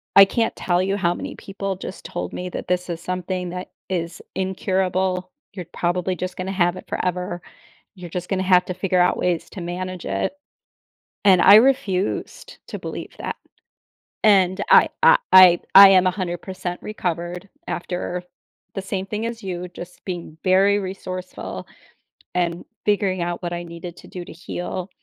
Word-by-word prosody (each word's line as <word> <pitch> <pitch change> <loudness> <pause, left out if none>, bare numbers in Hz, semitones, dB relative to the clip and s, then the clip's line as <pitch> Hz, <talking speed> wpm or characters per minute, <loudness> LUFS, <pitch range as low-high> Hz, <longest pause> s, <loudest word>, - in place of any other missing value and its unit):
I 195 - +10
can't 225 +3 -1
tell 175 -1 +1
you 195 +2 0
how 175 -3 +1
many - - -6
people 195 0 -5
just 185 +1 -8
told - - -5
me 180 0 -4
that - - -6
this 180 0 -1
is 170 -1 -4
something 180 0 -3
that 180 +1 -6 0.2
is 170 -2 -3
incurable. 185 -1 -1 0.2
"You're 185 -3 -6
probably 180 +1 -1
just 185 0 -5
gonna 185 +1 -3
have 175 -2 +2
it - - -11
forever. 180 -1 -2 0.5
You're 180 -2 -9
just 180 +1 -5
gonna 190 -1 0
have 180 -1 +4
to 185 - -4
figure 185 0 0
out 180 - +3
ways 175 -2 -1
to 190 - -7
manage 180 +1 -5
it," 95 - -2 0.9
and 185 -3 +6
I 200 - +9
refused 225 - +1
to - - -6
believe - - -7
that. - - -4 0.9
And 190 -2 +4
I - - +7
I - - +8 0.2
I 185 -2 +9 0.2
I 195 0 +12
am 185 -1 +5
a - - +3
100% 180 -1 -5
recovered 180 -2 -4 0.2
after 180 0 -3 0.5
the 195 - -3
same 190 0 -3
thing 210 +3 -3
as 230 0 -5
you, 180 -1 -4
just 175 0 -11
being 175 -4 -6
very 195 +2 +4
resourceful, 185 -1 -6 0.7
and 175 -1 -1 0.2
figuring 200 -3 +1
out 175 +1 -3
what 175 0 -3
I 175 0 -4
needed 170 0 -8
to - - -13
do 180 -1 -8
to - - -10
heal. 175 +2 -5
185 Hz, 170 wpm, -22 LUFS, 175-190 Hz, 0.9 s, I